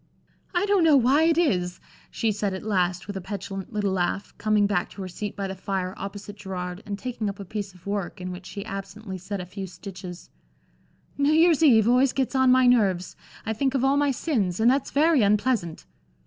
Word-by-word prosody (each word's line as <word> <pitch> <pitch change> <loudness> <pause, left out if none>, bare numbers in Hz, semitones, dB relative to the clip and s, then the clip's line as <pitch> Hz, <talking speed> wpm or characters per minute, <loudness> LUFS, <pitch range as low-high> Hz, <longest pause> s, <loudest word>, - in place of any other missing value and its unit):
"I 350 +3 +2
don't 400 -3 +3
know 310 -3 +6
why 270 +5 +4
it 330 -1 +3
is," 180 - +1 0.3
she 225 - 0
said 200 -2 -2
at 190 - -7
last 180 -4 0
with 205 - -6
a 190 - -4
petulant 195 +1 -6
little 205 -3 0
laugh, 190 +1 -1
coming 215 -1 +3
back 200 -3 0
to 195 - -8
her - - -5
seat 200 +3 -5
by 200 - -3
the 190 - -4
fire 190 -1 -3
opposite 205 +1 -7
Gerard, 180 -2 -5
and 200 -1 -3
taking 235 -2 -3
up 200 +1 -7
a 200 - -6
piece 200 -1 -5
of 180 - -19
work, 200 -3 -3
in 185 0 -5
which 180 +1 -9
she 200 +2 -7
absently 195 -1 -7
set 195 +2 -5
a 180 - -5
few 190 +2 -7
stitches, 180 -1 -9 0.9
"New 285 +1 +3
Year's 325 -1 +5
Eve 230 -9 +6
always 250 +2 +4
gets 265 -2 -1
on 260 -1 +4
my 255 0 +5
nerves, 200 -8 +2 0.3
I 220 - -1
think 265 +4 0
of 265 - +1
all 270 +1 +3
my 285 0 +2
sins 225 - -1
and 230 +2 +5
that's 270 0 0
very 305 -1 +3
unpleasant!" 205 -4 +1
205 Hz, 215 wpm, -25 LUFS, 190-255 Hz, 0.9 s, know